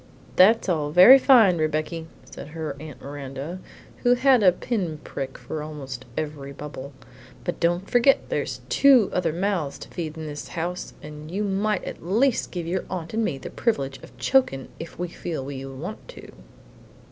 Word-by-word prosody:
"That's 215 Hz, +5 st, +5 dB
all 155 Hz, -5 st, 0 dB
very 185 Hz, -, +9 dB
fine, 225 Hz, -, +6 dB
Rebecky," 155 Hz, +1 st, -1 dB, 0.2 s
said -, -, -10 dB
her 155 Hz, -2 st, -5 dB
Aunt 155 Hz, -2 st, -10 dB
Miranda, 140 Hz, +4 st, -6 dB, 0.4 s
who 245 Hz, 0 st, +3 dB
had 260 Hz, -1 st, +4 dB
a 185 Hz, -3 st, +7 dB
pin 180 Hz, -4 st, -3 dB
prick 135 Hz, -1 st, -6 dB
for 155 Hz, -, -6 dB
almost 135 Hz, -5 st, -7 dB
every 145 Hz, -3 st, -4 dB
bubble; 140 Hz, -1 st, -8 dB, 0.5 s
"but -, -, -3 dB
don't 175 Hz, +3 st, +1 dB
forget 245 Hz, +3 st, +3 dB
there's -, -, -2 dB
two 265 Hz, -7 st, +5 dB
other 175 Hz, -3 st, +1 dB
mouths 175 Hz, -4 st, -1 dB
to -, -, -11 dB
feed 160 Hz, -2 st, -5 dB
in 160 Hz, -, -6 dB
this 145 Hz, -1 st, -6 dB
house, 175 Hz, +2 st, -4 dB
and 150 Hz, 0 st, -9 dB
you 195 Hz, +5 st, -2 dB
might 205 Hz, +1 st, 0 dB
at -, -, -7 dB
least 230 Hz, +9 st, +1 dB
give 175 Hz, -3 st, -5 dB
your 180 Hz, +3 st, -2 dB
aunt 175 Hz, -1 st, -5 dB
and 225 Hz, +1 st, +1 dB
me 140 Hz, -, -1 dB
the 135 Hz, -, -8 dB
privilege 140 Hz, -, -1 dB
of -, -, -15 dB
chokin' 255 Hz, -, +1 dB
if 165 Hz, -, -8 dB
we 180 Hz, -, -2 dB
feel 160 Hz, -5 st, -5 dB
to 135 Hz, -1 st, -6 dB
want 160 Hz, +11 st, -7 dB
to!" -, -, -12 dB
165 Hz, 175 wpm, -24 LUFS, 150-200 Hz, 0.5 s, very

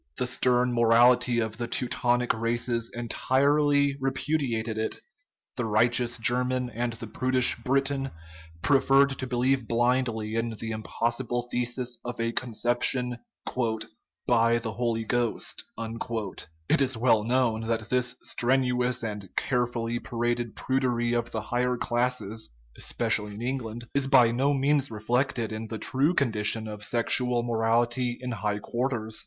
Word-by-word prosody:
The -, -, 0 dB
stern 125 Hz, -1 st, +2 dB
morality 120 Hz, +1 st, +4 dB
of 110 Hz, -1 st, -2 dB
the 120 Hz, 0 st, -3 dB
Teutonic 120 Hz, 0 st, 0 dB
races 115 Hz, +1 st, -1 dB
entirely 140 Hz, +4 st, +2 dB
repu 135 Hz, +3 st, -1 dB
diates 115 Hz, -4 st, -2 dB
it; 110 Hz, 0 st, -2 dB, 0.6 s
the 120 Hz, -, -1 dB
righteous 120 Hz, +3 st, +3 dB
German 125 Hz, +1 st, 0 dB
and 120 Hz, +1 st, -2 dB
the 115 Hz, 0 st, -7 dB
prudish 130 Hz, +3 st, +2 dB
Briton 135 Hz, +1 st, 0 dB, 0.5 s
prefer 135 Hz, 0 st, +5 dB
to 135 Hz, -1 st, -4 dB
believe 125 Hz, 0 st, +1 dB
blindly 120 Hz, -2 st, 0 dB
in 115 Hz, 0 st, -1 dB
the 110 Hz, -, -4 dB
impossible 120 Hz, +3 st, -2 dB
thesis 125 Hz, 0 st, -1 dB
of 120 Hz, -1 st, -6 dB
a 115 Hz, 0 st, 0 dB
conception 120 Hz, +1 st, 0 dB
* -, -, -10 dB, 0.8 s
by 115 Hz, 0 st, +4 dB
the 115 Hz, -1 st, -3 dB
Holy 115 Hz, -1 st, -1 dB
Ghost." 120 Hz, 0 st, -2 dB
It 110 Hz, -, -3 dB
is 130 Hz, -3 st, +1 dB
well 110 Hz, -2 st, +3 dB
known 115 Hz, -2 st, +1 dB
that 115 Hz, -1 st, -2 dB
this 125 Hz, 0 st, +1 dB
strenuous 125 Hz, -1 st, +1 dB
and 105 Hz, -4 st, -5 dB
carefully 120 Hz, -2 st, -1 dB
paraded 120 Hz, -1 st, -2 dB
prudery 125 Hz, -3 st, 0 dB
of 120 Hz, -1 st, -1 dB
the 110 Hz, -, -3 dB
higher 125 Hz, +2 st, -1 dB
classes 120 Hz, -, -1 dB, 0.3 s
(especially 105 Hz, -1 st, -1 dB
in 110 Hz, -, -7 dB
England) 120 Hz, -2 st, -4 dB
is 140 Hz, -1 st, +1 dB
by 125 Hz, -4 st, +6 dB
no 135 Hz, +4 st, +1 dB
means 140 Hz, +1 st, +2 dB
reflected 115 Hz, +1 st, -1 dB
in 110 Hz, +1 st, -5 dB
the 110 Hz, -, -5 dB
true 140 Hz, -, +1 dB
condition 110 Hz, -4 st, +1 dB
of 105 Hz, -1 st, -7 dB
sexual 120 Hz, +1 st, +2 dB
morality 120 Hz, +1 st, +1 dB
in 125 Hz, -1 st, -5 dB
high 105 Hz, -2 st, -2 dB
quarters. 120 Hz, -1 st, -2 dB
120 Hz, 135 wpm, -27 LUFS, 115-125 Hz, 0.8 s, by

